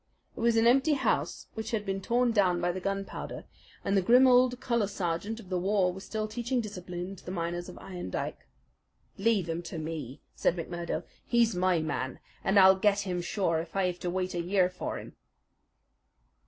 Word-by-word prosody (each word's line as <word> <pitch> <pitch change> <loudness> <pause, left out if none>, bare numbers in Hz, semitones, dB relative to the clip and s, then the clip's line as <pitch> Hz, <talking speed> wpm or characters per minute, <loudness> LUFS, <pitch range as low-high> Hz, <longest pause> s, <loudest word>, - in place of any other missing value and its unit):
It - - -9
was 230 0 +3
an 225 - +4
empty 270 +6 +5
house 275 - 0
which 220 0 -5
had 220 -4 -2
been 195 -1 -2
torn 240 +4 +2
down 185 -5 +3
by 175 - +1
the 185 - -4
gunpowder, 195 +1 -4 0.4
and 200 - +1
the 195 - +4
grim 245 +7 +6
old 250 -1 +5
colour 235 -5 +1
sergeant 195 +3 -3
of 195 -5 -12
the 185 -1 0
war 190 -1 +2
was 190 +1 -9
still 215 -1 -3
teaching 240 +3 -1
discipline 180 -3 -5
to - - -16
the - - -8
miners 175 0 -3
of 180 - -10
Iron 180 - -7
Dike. - - -4 0.7
"Leave 205 -4 +2
him 165 +1 -2
to 170 - -7
me," 155 -4 -5
said - - +1
McMurdo. 175 0 -4 0.2
"He's 235 -2 +3
my 180 -2 +2
man, 130 -4 -3 0.3
and 195 +2 +2
I'll 190 0 +8
get 205 +1 +3
him 180 -3 -2
sure 170 -3 0
if 165 +3 -7
I 195 -1 +2
have 180 -1 -2
to 180 - -2
wait 185 +1 -2
a 175 - -1
year 185 +1 +2
for 180 - -4
him." - - -10
190 Hz, 200 wpm, -29 LUFS, 175-220 Hz, 0.7 s, I'll